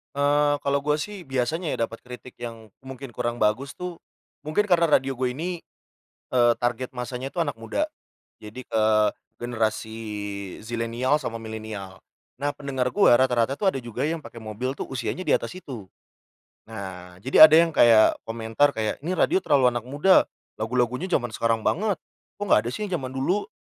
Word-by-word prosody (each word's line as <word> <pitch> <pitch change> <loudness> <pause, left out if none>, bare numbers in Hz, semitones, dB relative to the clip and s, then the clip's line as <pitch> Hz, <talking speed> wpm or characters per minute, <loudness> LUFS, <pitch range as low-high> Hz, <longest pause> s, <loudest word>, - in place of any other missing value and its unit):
Eee, 145 +1 +3
kalo 140 0 +1
gue 150 +1 +1
sih 185 +2 -6
biasanya 140 +6 -1
ya, - - -8
dapet 115 0 -5
kritik 125 0 -12
yang 115 -3 -8
mungkin 135 -1 -9
kurang 120 0 -2
bagus 120 +5 0
tuh, 180 -1 -6 0.5
mungkin 155 +7 +2
karena 175 -4 +3
radio 135 -2 +3
gue 125 -1 -2
ini, 175 +4 -3 0.8
eee, 120 -1 +5
target 120 +1 -1
massanya 125 +2 -5
tuh 175 - -5
anak 145 - -3
muda. 115 - -2 0.6
Jadi, 110 +4 -9
ke 110 -1 +1 0.6
generasi 110 -2 -2 0.6
zilenial 115 +4 -1
sama 115 -5 -5
milenial. 110 -4 -7 0.4
Nah 145 +1 0
pendengar 135 -3 -2
gua 200 -11 +6
rata-rata 130 0 +2
tuh 195 -2 +3
ada 135 - -4
juga 120 +1 -5
yang 165 +1 -2
pake 115 - -10
mobil 110 +4 -4
tuh - - -4
usianya 130 +7 -3
di - - 0
atas - - -3
situ. 125 - -8 0.8
Nah, 95 -4 -8
jadi 130 +6 +9
ada 155 - +3
yang 170 0 +4
kaya 115 -2 +6
komentar 115 +5 +1
kaya, 110 -1 -2
"Ini 175 +5 -2
radio 360 - +3
terlalu 130 -3 +4
anak 120 - -2
muda 145 +8 +4 0.4
lagu-lagunya 125 +6 0
jaman 120 -8 +1
sekarang 115 -1 +1
banget 200 -1 +1 0.4
kok 205 - -2
gak 105 - +6
ada - - -1
sih 210 - -3
yang 175 -5 -2
jaman 130 -1 -5
dulu." 175 - 0
125 Hz, 175 wpm, -25 LUFS, 115-145 Hz, 0.8 s, jadi